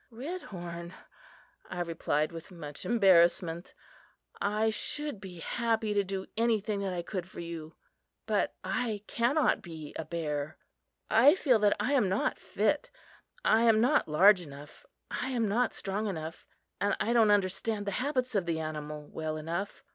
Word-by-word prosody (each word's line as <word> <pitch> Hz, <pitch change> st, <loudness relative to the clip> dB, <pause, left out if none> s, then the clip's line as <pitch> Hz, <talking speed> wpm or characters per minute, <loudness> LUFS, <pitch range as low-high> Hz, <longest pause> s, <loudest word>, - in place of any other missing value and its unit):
"Redhorn," 185 Hz, -, -7 dB, 0.7 s
I 180 Hz, -1 st, -3 dB
replied 160 Hz, -2 st, 0 dB
with 165 Hz, +2 st, -9 dB
much 150 Hz, -6 st, -9 dB
embarrassment, 175 Hz, -5 st, +3 dB, 0.7 s
"I 215 Hz, +2 st, +1 dB
should 295 Hz, 0 st, -3 dB
be 180 Hz, -3 st, -9 dB
happy 225 Hz, +1 st, 0 dB
to 200 Hz, -1 st, +2 dB
do 190 Hz, 0 st, -4 dB
anything 220 Hz, -2 st, +1 dB
that 195 Hz, -1 st, -2 dB
I 175 Hz, -1 st, -3 dB
could 185 Hz, -1 st, -5 dB
for -, -, -10 dB
you, 165 Hz, -2 st, -7 dB, 0.5 s
but -, -, 0 dB
I 220 Hz, -5 st, -2 dB
cannot 250 Hz, +9 st, +2 dB
be 160 Hz, -4 st, -9 dB
a -, -, -2 dB
bear. 150 Hz, -3 st, -3 dB, 0.5 s
I 260 Hz, +9 st, +7 dB
feel 260 Hz, -11 st, +3 dB
that 205 Hz, -1 st, +3 dB
I 220 Hz, +7 st, +1 dB
am 240 Hz, -9 st, +3 dB
not 215 Hz, +11 st, 0 dB
fit. -, -, 0 dB, 0.6 s
I 220 Hz, -, +5 dB
am 225 Hz, -2 st, +5 dB
not 260 Hz, +7 st, +3 dB
large 180 Hz, +5 st, +6 dB
enough; 145 Hz, -2 st, -12 dB, 0.2 s
I 255 Hz, -, -2 dB
am 235 Hz, -4 st, 0 dB
not 230 Hz, +4 st, +1 dB
strong 205 Hz, +2 st, -3 dB
enough; 160 Hz, -4 st, -6 dB, 0.3 s
and 205 Hz, -, +1 dB
I 230 Hz, -, +1 dB
don't 225 Hz, -3 st, +5 dB
understand 205 Hz, +1 st, +1 dB
the 200 Hz, -, -1 dB
habits 255 Hz, -3 st, -1 dB
of 195 Hz, -5 st, 0 dB
the 165 Hz, -1 st, 0 dB
animal 150 Hz, -1 st, -5 dB
well 155 Hz, -1 st, -4 dB
enough. 170 Hz, +6 st, -4 dB
195 Hz, 155 wpm, -30 LUFS, 170-225 Hz, 0.7 s, I